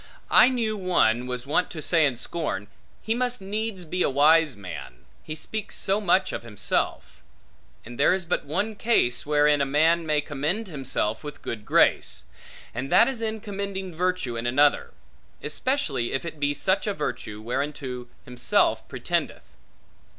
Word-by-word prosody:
I - - +7
knew 230 -4 -1
one, 125 - +2
was 125 0 -4
wont 150 +6 +1
to 160 - -7
say 160 0 +3
in 135 - -2
scorn, 125 - -3 0.4
He 220 - 0
must 250 +1 -1
needs 200 -1 -4
be 180 +3 -3
a - - +3
wise 150 0 +4
man, 65 -10 -9 0.2
he 155 - -6
speaks 215 +6 -5
so 200 +2 +1
much 190 -1 +2
of - - -3
himself: 115 -4 -2 0.6
and 120 +2 -10
there 140 - +5
is 190 -2 -4
but 175 - -1
one 195 +10 -2
case, 205 - +1
wherein 150 -1 +3
a - - +2
man 160 +4 +3
may 155 -2 +1
commend 150 +9 -2
himself 135 - -2
with 145 -1 -8
good 110 -2 -5
grace; - - +2 0.5
and 130 +4 -4
that 185 +6 +6
is 260 -4 -3
in 220 -1 -2
commending 200 -3 -5
virtue 180 -7 -1
in 115 +1 -3
another; 145 +4 +3 0.5
especially 155 - -1
if 135 - -2
it 160 -2 -7
be 145 0 +1
such 190 +5 +1
a 205 - -1
virtue, 105 -7 -4
whereunto 125 +1 -4 0.2
himself 125 -1 +1
pretendeth. - - -3
155 Hz, 165 wpm, -25 LUFS, 130-195 Hz, 0.6 s, I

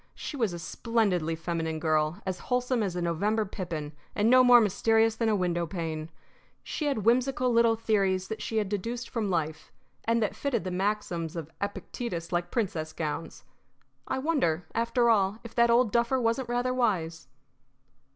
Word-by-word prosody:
She - - -6
was 230 -8 0
a 175 - -5
splendidly 180 -3 0
feminine 165 -1 -3
girl, 155 +4 0
as 185 -1 -3
wholesome 250 -1 +1
as 190 -4 -1
a 175 - -2
November 205 +6 0
pippin, 170 -7 -5 0.2
and 215 +3 +3
no 255 0 +7
more 245 -1 +8
mysterious 225 +1 +3
than 230 -1 0
a 215 - +3
window 175 -3 0
pane. 160 -2 -4 0.5
She 305 - -4
had 225 -8 -1
whimsical 250 +1 +2
little 230 -1 +4
theories 195 -4 +1
that 220 - -5
she 225 - -3
had 210 -2 +1
deduced 230 +5 -4
from 220 -4 -1
life, 160 -3 -2 0.3
and 230 +1 +2
that 210 - -2
fitted 255 -9 -1
the 185 - -4
maxims 180 -4 -2
of 160 -2 -6
Epictetus 200 -3 -4
like 175 0 -1
princess 175 -9 -2
gowns. 160 +1 -4 0.6
I 265 - -1
wonder, 260 - 0
after 235 +1 +1
all, 200 -1 +2
if 235 - -10
that 235 0 +4
old 235 -1 +4
duffer 235 +3 +2
wasn't 235 +1 0
rather 245 +1 0
wise! 170 - -1
210 Hz, 170 wpm, -28 LUFS, 170-235 Hz, 0.6 s, more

